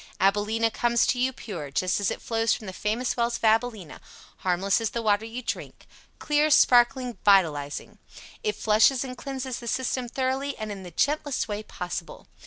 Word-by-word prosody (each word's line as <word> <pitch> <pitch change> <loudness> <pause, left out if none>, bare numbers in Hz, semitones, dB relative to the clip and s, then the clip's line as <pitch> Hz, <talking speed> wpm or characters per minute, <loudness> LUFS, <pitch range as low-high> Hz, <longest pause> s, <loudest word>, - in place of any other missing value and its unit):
AbilenA 210 +4 +2
comes 235 -1 +2
to 250 - 0
you 255 +1 +2
pure 180 - -7
just 180 +8 0
as 200 - +1
it - - -5
flows 225 0 +1
from 220 - -10
the 190 - -6
Famous 220 +6 -1
Wells 235 0 0
of - - -20
AbilenA 220 -6 0 0.4
harmless 190 +4 +1
as 225 - 0
the 235 - -3
water 210 0 +2
you 235 +3 -6
drink - - -6 0.3
clear, 300 +1 +2
sparkling, 245 -3 +4
vitalizing. 160 -8 +2 0.4
It 430 -2 -1
flushes 225 +5 +3
and 255 -1 -6
cleanses 265 -1 -5
the 235 - -9
system 255 0 -1
thoroughly, 265 +2 -2
and 215 -1 -5
in 200 -1 -7
the 180 - -9
gentlest 290 - 0
way 210 -1 -3
possible. 180 -5 -6
225 Hz, 180 wpm, -26 LUFS, 205-255 Hz, 0.4 s, sparkling